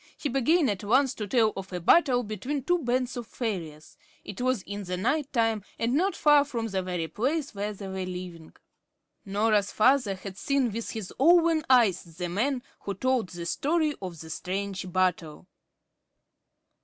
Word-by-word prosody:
He 290 Hz, -, -3 dB
began 275 Hz, +5 st, +3 dB
at 200 Hz, -2 st, -2 dB
once 260 Hz, +5 st, +3 dB
to 210 Hz, -, -5 dB
tell 220 Hz, 0 st, +3 dB
of 195 Hz, 0 st, -7 dB
a 180 Hz, -, -3 dB
battle 245 Hz, -, +4 dB
between 245 Hz, +7 st, -4 dB
two 355 Hz, +4 st, +2 dB
bands 255 Hz, -2 st, -1 dB
of 240 Hz, -2 st, -6 dB
fairies. 165 Hz, -12 st, -5 dB, 0.3 s
It 200 Hz, +3 st, -7 dB
was 255 Hz, -5 st, 0 dB
in 200 Hz, 0 st, -6 dB
the 180 Hz, 0 st, -3 dB
night 285 Hz, +9 st, 0 dB
time, 225 Hz, -4 st, +1 dB
and 230 Hz, +2 st, 0 dB
not 370 Hz, +7 st, +1 dB
far 295 Hz, -1 st, +5 dB
from 240 Hz, -5 st, -4 dB
the 190 Hz, -2 st, -1 dB
very 180 Hz, -3 st, -3 dB
place 275 Hz, -, -2 dB
where 205 Hz, +1 st, -3 dB
they 200 Hz, -1 st, -8 dB
were 190 Hz, -1 st, -4 dB
living. 180 Hz, -3 st, -8 dB, 0.7 s
Norah's 205 Hz, 0 st, +1 dB
father 245 Hz, -3 st, +3 dB
had 190 Hz, 0 st, -9 dB
seen 275 Hz, -4 st, +1 dB
with 230 Hz, +2 st, -4 dB
his 220 Hz, -5 st, -6 dB
own 330 Hz, +2 st, +5 dB
eyes 230 Hz, -8 st, +5 dB, 0.2 s
the 180 Hz, -1 st, -3 dB
man 245 Hz, +8 st, -1 dB, 0.2 s
who 200 Hz, -, -5 dB
told 255 Hz, -2 st, 0 dB
the 175 Hz, -1 st, -7 dB
story 305 Hz, -, +1 dB
of 180 Hz, -4 st, -6 dB
the 160 Hz, 0 st, -9 dB
strange 190 Hz, +1 st, -4 dB
battle. 180 Hz, -3 st, -1 dB
215 Hz, 175 wpm, -27 LUFS, 185-265 Hz, 0.7 s, far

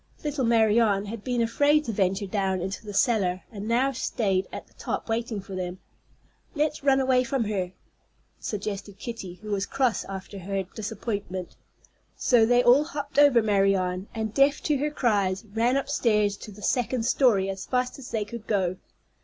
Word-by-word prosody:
Little 290 Hz, -3 st, -1 dB
Marianne 220 Hz, -3 st, +3 dB
had 210 Hz, 0 st, -7 dB
been 245 Hz, -2 st, 0 dB
afraid 290 Hz, +6 st, +3 dB
to 230 Hz, -, -2 dB
venture 195 Hz, 0 st, 0 dB
down 190 Hz, -1 st, -1 dB
into 190 Hz, +5 st, -4 dB
the 210 Hz, -, -7 dB
cellar, 195 Hz, -5 st, +1 dB
and 210 Hz, -1 st, -6 dB
now 250 Hz, +4 st, +2 dB
stayed 195 Hz, -7 st, -1 dB
at -, -, -7 dB
the -, -, -28 dB
top -, -, -4 dB
waiting 225 Hz, -1 st, -2 dB
for 195 Hz, 0 st, -9 dB
them. 180 Hz, -1 st, -4 dB, 0.8 s
"Let's 300 Hz, -1 st, 0 dB
run 270 Hz, -1 st, +4 dB
away 260 Hz, -1 st, +3 dB
from 255 Hz, 0 st, -1 dB
her," 190 Hz, -4 st, -2 dB, 0.7 s
suggested 205 Hz, -1 st, -5 dB
Kitty, 230 Hz, -7 st, -6 dB
who 215 Hz, -, -6 dB
was 200 Hz, -1 st, -1 dB
cross 260 Hz, -4 st, +1 dB
after 195 Hz, +1 st, -7 dB
her 195 Hz, +1 st, -2 dB
disappointment. 200 Hz, -2 st, -5 dB, 0.6 s
So 230 Hz, -3 st, +4 dB
they 245 Hz, +1 st, +4 dB
all 255 Hz, +5 st, +6 dB
hopped 290 Hz, -3 st, -3 dB
over 275 Hz, -6 st, +6 dB
Marianne, 195 Hz, -2 st, +1 dB
and, 220 Hz, -1 st, -3 dB
deaf 280 Hz, +3 st, +4 dB
to 300 Hz, -2 st, +2 dB
her 295 Hz, +3 st, 0 dB
cries, 205 Hz, -8 st, 0 dB
ran 235 Hz, +4 st, +2 dB
upstairs 220 Hz, -8 st, +1 dB
to 215 Hz, -, -10 dB
the 210 Hz, +1 st, -13 dB
second 245 Hz, -1 st, 0 dB
story 225 Hz, -8 st, +3 dB
as 195 Hz, 0 st, -5 dB
fast 250 Hz, +1 st, -1 dB
as 255 Hz, -, -9 dB
they 215 Hz, -2 st, -1 dB
could 230 Hz, +1 st, -9 dB
go. 185 Hz, -4 st, 0 dB
220 Hz, 175 wpm, -26 LUFS, 195-250 Hz, 0.8 s, all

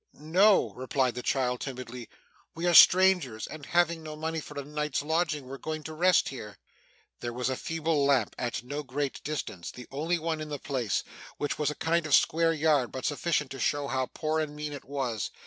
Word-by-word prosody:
'No,' 185 Hz, +7 st, +3 dB
replied 130 Hz, 0 st, 0 dB
the 125 Hz, -, -5 dB
child 125 Hz, -1 st, 0 dB
timidly; 125 Hz, -3 st, -6 dB, 0.5 s
'we 165 Hz, +2 st, -3 dB
are 175 Hz, -, +3 dB
strangers, 180 Hz, -10 st, +6 dB
and 150 Hz, -3 st, -9 dB
having 170 Hz, -1 st, +2 dB
no 155 Hz, -1 st, -7 dB
money 160 Hz, +1 st, -3 dB
for 150 Hz, -1 st, -8 dB
a 140 Hz, -, -6 dB
night's 150 Hz, -1 st, -2 dB
lodging, 160 Hz, -2 st, 0 dB
were 135 Hz, +1 st, -8 dB
going 155 Hz, -1 st, -4 dB
to 160 Hz, -, -7 dB
rest 175 Hz, +3 st, +3 dB
here.' 105 Hz, -6 st, -8 dB, 0.6 s
There 120 Hz, -, -4 dB
was 125 Hz, +1 st, -1 dB
a -, -, -1 dB
feeble 160 Hz, 0 st, -1 dB
lamp 135 Hz, -6 st, +2 dB
at 120 Hz, -1 st, -2 dB
no 145 Hz, +4 st, -4 dB
great 140 Hz, 0 st, -4 dB
distance; 130 Hz, -, -4 dB
the 125 Hz, -, -10 dB
only 160 Hz, +6 st, 0 dB
one 160 Hz, -1 st, -2 dB
in 155 Hz, -, -6 dB
the 145 Hz, -, -3 dB
place, 125 Hz, -8 st, -1 dB, 0.3 s
which 145 Hz, -, -2 dB
was 150 Hz, -2 st, +1 dB
a 150 Hz, -, -4 dB
kind 165 Hz, 0 st, 0 dB
of 145 Hz, -, +6 dB
square 165 Hz, +1 st, +3 dB
yard, 150 Hz, -6 st, +2 dB
but 130 Hz, -, -5 dB
sufficient 145 Hz, -1 st, 0 dB
to 135 Hz, -, -7 dB
show 145 Hz, +3 st, 0 dB
how 130 Hz, -1 st, 0 dB
poor 155 Hz, 0 st, -1 dB
and 150 Hz, -1 st, -3 dB
mean 150 Hz, 0 st, -5 dB
it 140 Hz, -, -8 dB
was. 130 Hz, -7 st, -2 dB
145 Hz, 205 wpm, -29 LUFS, 130-160 Hz, 0.6 s, strangers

